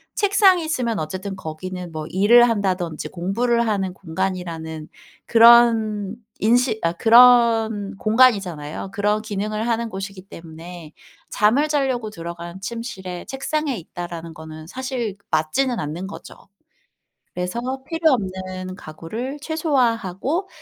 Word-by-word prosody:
책상이 390 Hz, -3 st, +4 dB
있으면 245 Hz, -, -1 dB
어쨌든 185 Hz, +5 st, -5 dB
거기는 180 Hz, +1 st, -7 dB
뭐 155 Hz, -1 st, -5 dB
일을 235 Hz, +6 st, +6 dB
한다든지 185 Hz, -7 st, -1 dB
공부를 235 Hz, +7 st, 0 dB
하는 195 Hz, -3 st, 0 dB
공간이라는 165 Hz, -3 st, -4 dB, 0.4 s
그런 225 Hz, -3 st, +5 dB, 0.2 s
인식 235 Hz, +1 st, +3 dB
아 165 Hz, -, +2 dB
그런 225 Hz, -2 st, +5 dB
공간이잖아요. 195 Hz, -8 st, +1 dB
그런 210 Hz, 0 st, +1 dB
기능을 215 Hz, +1 st, -3 dB
하는 230 Hz, 0 st, -1 dB
곳이기 195 Hz, -1 st, -7 dB
때문에 165 Hz, 0 st, -10 dB, 0.4 s
잠을 240 Hz, +9 st, +2 dB
자려고 260 Hz, -7 st, 0 dB
들어간 170 Hz, +1 st, -8 dB
침실에 195 Hz, -5 st, -6 dB
책상이 275 Hz, -2 st, -2 dB
있다라는 170 Hz, -1 st, -7 dB
거는 155 Hz, 0 st, -10 dB
사실 250 Hz, -2 st, -4 dB
맞지는 220 Hz, +11 st, +1 dB
않는 165 Hz, +3 st, -4 dB
거죠. 200 Hz, -, -10 dB, 1.0 s
그래서 180 Hz, +6 st, -3 dB, 0.3 s
필요 325 Hz, -2 st, +2 dB
없는 185 Hz, -3 st, -3 dB
가구를 220 Hz, -, -6 dB
최소화하고 275 Hz, -, 0 dB
205 Hz, 290 characters per minute, -22 LUFS, 180-240 Hz, 1.0 s, 일을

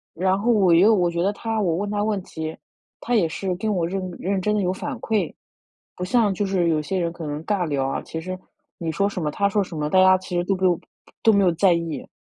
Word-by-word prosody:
然 185 Hz, +3 st, +1 dB
后 225 Hz, +4 st, +1 dB
我 190 Hz, -6 st, +4 dB
又 200 Hz, +7 st, +6 dB
我 175 Hz, -4 st, +2 dB
觉 170 Hz, 0 st, -1 dB
得 195 Hz, +3 st, +1 dB
他 225 Hz, +1 st, -3 dB
我 170 Hz, -5 st, +1 dB
问 205 Hz, +2 st, -2 dB
他 205 Hz, 0 st, -1 dB
问 210 Hz, -2 st, 0 dB
题， 160 Hz, -2 st, -6 dB, 0.4 s
他 245 Hz, -, -1 dB
也 195 Hz, -8 st, +3 dB
是 185 Hz, +3 st, -3 dB
跟 215 Hz, +4 st, -1 dB
我 175 Hz, -4 st, 0 dB
认 185 Hz, 0 st, -3 dB
认 195 Hz, +1 st, -1 dB
真 210 Hz, +3 st, 0 dB
地 205 Hz, -, +1 dB
有 180 Hz, -, +1 dB
反 255 Hz, +8 st, -5 dB
馈。 210 Hz, -8 st, -1 dB, 0.6 s
不 180 Hz, -, -4 dB
像 215 Hz, +1 st, +2 dB
就 200 Hz, +2 st, -1 dB
是 185 Hz, -3 st, +1 dB
有 155 Hz, -2 st, +2 dB
些 185 Hz, +5 st, -2 dB
人 170 Hz, -2 st, -1 dB
可 170 Hz, -3 st, -7 dB
能 150 Hz, +2 st, -5 dB
尬 200 Hz, -4 st, 0 dB
聊 140 Hz, -3 st, -1 dB
啊， 135 Hz, -, -2 dB
其 160 Hz, -, -6 dB
实 185 Hz, +2 st, -5 dB, 0.4 s
你 165 Hz, -4 st, -3 dB
说 200 Hz, +5 st, +1 dB
什 185 Hz, -3 st, -4 dB
么 150 Hz, -, 0 dB
他 200 Hz, +6 st, +1 dB
说 205 Hz, +1 st, +1 dB
什 175 Hz, -4 st, -7 dB
么， 150 Hz, 0 st, -1 dB
大 185 Hz, -, +5 dB
家 185 Hz, 0 st, +7 dB
其 185 Hz, -1 st, -6 dB
实 175 Hz, -, +1 dB
都 195 Hz, +1 st, 0 dB
没 185 Hz, 0 st, +1 dB
有 175 Hz, -2 st, +2 dB, 0.4 s
都 225 Hz, -, +6 dB
没 200 Hz, -1 st, +4 dB
有 175 Hz, -, +4 dB
在 180 Hz, +3 st, +3 dB
意。 170 Hz, -2 st, -2 dB
185 Hz, 290 characters per minute, -23 LUFS, 170-200 Hz, 0.6 s, 家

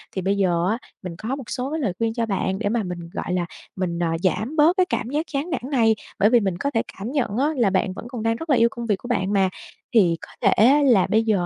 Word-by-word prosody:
Thì 190 Hz, -, -1 dB
bây 195 Hz, +2 st, 0 dB
giờ 175 Hz, -3 st, +1 dB
á, 220 Hz, -, 0 dB, 0.3 s
mình 180 Hz, -2 st, -6 dB
có 230 Hz, +8 st, -3 dB
một 275 Hz, -, -7 dB
số 260 Hz, +2 st, -3 dB
cái 320 Hz, -, -2 dB
lời 220 Hz, -, -1 dB
khuyên 225 Hz, -1 st, 0 dB
cho 230 Hz, 0 st, -1 dB
bạn 195 Hz, -2 st, -1 dB
để 210 Hz, -2 st, 0 dB
mà 230 Hz, 0 st, 0 dB
mình, 175 Hz, -2 st, -6 dB
gọi 180 Hz, -, -3 dB
là, 180 Hz, -1 st, 0 dB, 0.3 s
mình, 175 Hz, -2 st, -2 dB
à, 165 Hz, -1 st, 0 dB
giảm 215 Hz, +9 st, 0 dB
bớt 320 Hz, +4 st, +4 dB
cái 370 Hz, -, +4 dB
cảm 240 Hz, -9 st, -2 dB
giác 300 Hz, +4 st, -1 dB
chán 285 Hz, +3 st, -2 dB
nản 345 Hz, -, -2 dB
này, 225 Hz, -5 st, +3 dB, 0.2 s
bởi 210 Hz, -, +5 dB
vì 240 Hz, 0 st, +5 dB
mình 190 Hz, -5 st, -1 dB
có 280 Hz, +10 st, -2 dB
thể 225 Hz, -, +1 dB, 0.2 s
cảm 210 Hz, +5 st, -5 dB
nhận 255 Hz, -7 st, -1 dB
á 275 Hz, +3 st, +2 dB
là 235 Hz, -5 st, +3 dB
bạn 190 Hz, 0 st, 0 dB
vẫn 200 Hz, -, -9 dB
còn 240 Hz, -3 st, -6 dB
đang 225 Hz, 0 st, +1 dB
rất 325 Hz, +7 st, -8 dB
là 280 Hz, -, +5 dB
yêu 235 Hz, -1 st, +4 dB
công 235 Hz, -, -6 dB
việc 210 Hz, -3 st, +2 dB
của 240 Hz, -, -10 dB
bạn 200 Hz, -5 st, 0 dB
mà. 195 Hz, -2 st, +3 dB, 0.4 s
Thì 185 Hz, -8 st, +4 dB
có -, -, -11 dB
thể -, -, +4 dB, 0.2 s
á 285 Hz, +4 st, +5 dB
là 235 Hz, -9 st, +4 dB
bây 220 Hz, +1 st, +3 dB
giờ 205 Hz, -6 st, +1 dB
225 Hz, 295 wpm, -23 LUFS, 190-255 Hz, 0.4 s, bởi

